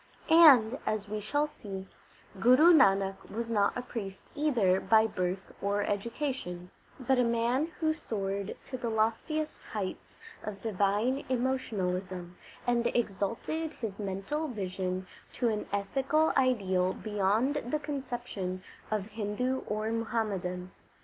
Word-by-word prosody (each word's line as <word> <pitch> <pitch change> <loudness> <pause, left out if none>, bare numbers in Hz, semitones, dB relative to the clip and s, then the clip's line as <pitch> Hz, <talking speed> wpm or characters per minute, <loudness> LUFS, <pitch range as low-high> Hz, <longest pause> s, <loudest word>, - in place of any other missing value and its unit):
And, 270 -8 +8
as 215 -1 -2
we 215 +1 -3
shall 290 +8 0
see, 195 -10 -7 0.5
Guru 255 - +7
Nanak 195 -9 +3
was 230 +2 -3
not 205 0 +2
a 245 - -3
priest 200 -6 -7
either 235 -12 +2
by 220 +1 +4
birth 185 -2 -3
or 200 +1 +1
education, 205 -5 -3 0.3
but 260 0 +2
a - - +5
man 235 +5 +1
who 315 -1 +2
soared 200 -8 -3
to 255 - -6
the 235 - -2
loftiest 230 +8 -1
heights 200 -4 -5 0.2
of 205 -2 -6
divine 210 +6 +1
emotionalism, 190 -9 -2 0.3
and 235 -1 +2
exalted 230 +9 -1
his 215 -4 -5
mental 200 +11 -2
vision 185 -5 -3 0.3
to 245 -2 +1
an 210 -1 -2
ethical 270 +10 +1
ideal 190 -8 +2
beyond 215 +6 +1
the 305 - +1
conception 240 -10 -4 0.3
of 215 -3 -1
Hindu 220 +5 -1
or 215 +1 -1
Muhammadan. 200 -6 -2
220 Hz, 125 wpm, -30 LUFS, 195-255 Hz, 0.5 s, And